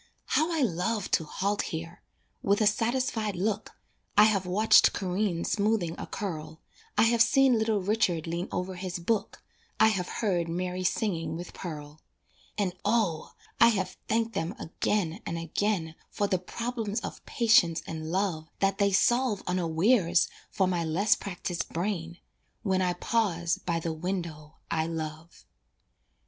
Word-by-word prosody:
How 315 +3 +1
I 320 -4 +1
love 205 +1 -1
to 160 - +2
halt 200 +6 -1
here! 165 +1 -6 0.4
With 200 +1 +2
a 215 - +3
satisfied 225 0 0
look, 210 +3 -2 0.4
I 210 - +9
have 200 -4 +2
watched 210 +5 +5
Corinne 185 -2 -1
smoothing 205 -5 +1
a - - -5
curl, 160 -5 -5 0.4
I - - +6
have 230 0 +3
seen 265 -1 +5
little 220 -3 +1
Richard 195 -5 +1
lean 170 +2 -3
over 180 +1 -2
his 185 0 -4
book, 200 +5 -2 0.4
I 220 - +7
have 185 -4 -1
heard 180 -7 0
Mary 180 +2 -2
singing 165 -5 -1
with 175 +1 -8
Pearl. 150 -3 -8 0.6
And 195 -4 0
O! 205 -7 0 0.3
I 230 - +8
have 190 -5 0
thanked 225 +1 0
them 165 +6 -2
again 180 0 -1
and 170 - -4
again 165 0 -1 0.2
For 205 - -1
the 185 -2 +1
problems 225 +2 -3
of - - -7
patience 195 -8 +4
and 160 0 -5
love 180 -4 -1
That 195 0 +1
they 200 0 +3
solve 240 +2 +2
unawares 180 +1 +2 0.2
for 190 - +1
my 175 -2 0
less 180 +7 +3
practiced 180 -2 -4
brain 170 -1 -3 0.5
When 190 -2 +1
I 180 -1 +1
pause 175 -4 0
by 170 -1 -1
the 165 0 -3
window 160 -3 -4 0.2
I 160 -1 +1
love. 160 0 -6
185 Hz, 150 wpm, -28 LUFS, 170-215 Hz, 0.6 s, I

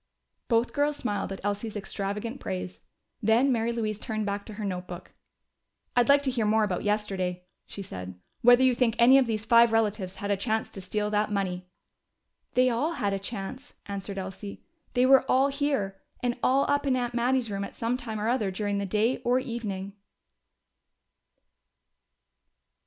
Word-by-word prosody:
Both 230 0 +2
girls 290 0 +1
smiled 205 -4 -2
at 195 - -6
Elsie's 205 +1 -2
extravagant 205 +5 -4
praise. 90 -1 -5 0.4
Then 230 +6 +4
Mary 230 -1 +1
Louise 215 -3 -2
turned 215 -3 -3
back 200 0 -3
to 215 - -8
her 210 -1 -4
notebook. 180 -2 -6 0.8
"I'd 245 0 +3
like 280 0 +6
to 265 - 0
hear 230 -4 0
more 220 +1 +3
about 185 -4 -1
yesterday," 195 -4 -1 0.2
she 200 - -7
said: 90 - -8 0.2
"whether 245 +2 +7
you 260 -1 +5
think 235 -2 +1
any 255 +3 +7
of 260 - +1
these 220 -1 -2
five 235 0 +6
relatives 210 -4 0
had 205 0 -3
a - - +3
chance 220 +2 -1
to 195 - -9
steal 210 +3 -2
that 210 0 +1
money." 185 -3 -2 0.9
"They 255 0 +5
all 285 +9 0
had 200 -10 -1
a 195 - -1
chance," 225 +6 -6
answered 200 0 -5
Elsie. 195 +2 -7 0.3
"They 250 +1 +4
were 270 0 +6
all 270 +2 +4
here 275 -9 -1 0.2
and 245 -1 +1
all 270 +2 +3
up 285 0 +1
in 260 - +3
Aunt 245 -1 -2
Mattie's 245 -1 +1
room 200 0 -2
at - - -7
some 230 +1 -1
time 225 -4 -5
or 210 - -1
other 235 -4 +1
during 200 +1 -2
the 200 - -2
day 220 +6 +1
or 245 +1 +1
evening!" 215 -7 -4
215 Hz, 175 wpm, -27 LUFS, 200-245 Hz, 0.9 s, whether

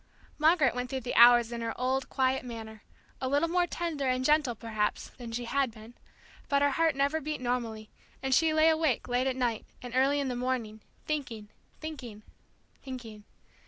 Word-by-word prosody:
Margaret 310 -3 +4
went 250 0 -3
through 265 -1 -3
the 245 - -4
hours 240 0 +7
in 235 0 -4
her 230 0 -4
old, 260 +1 0
quiet 260 0 +1
manner, 225 -3 -8 0.4
a 260 - -1
little 290 +4 +2
more 350 +1 +1
tender 330 -6 -3
and 255 0 0
gentle 295 -5 +3
perhaps 215 -2 -2
than 240 -3 -10
she 240 +1 -3
had 275 +2 +1
been; 220 +1 -13 0.6
but 280 0 +3
her 285 - +3
heart 325 +1 +2
never 280 +3 +1
beat 305 +1 -4
normally, 235 -3 -3 0.3
and 265 0 +1
she 320 +4 +4
lay 310 +1 +5
awake 315 -6 +1
late 250 +1 +1
at 260 - 0
night, 240 -4 -1 0.2
and 245 -1 -9
early 275 +2 +3
in 280 - -1
the 250 - -2
morning, 245 -4 -3 0.2
thinking, 240 -9 -4 0.3
thinking, 250 -9 -7 0.6
thinking. 230 -6 -9
255 Hz, 185 wpm, -29 LUFS, 235-285 Hz, 0.6 s, hours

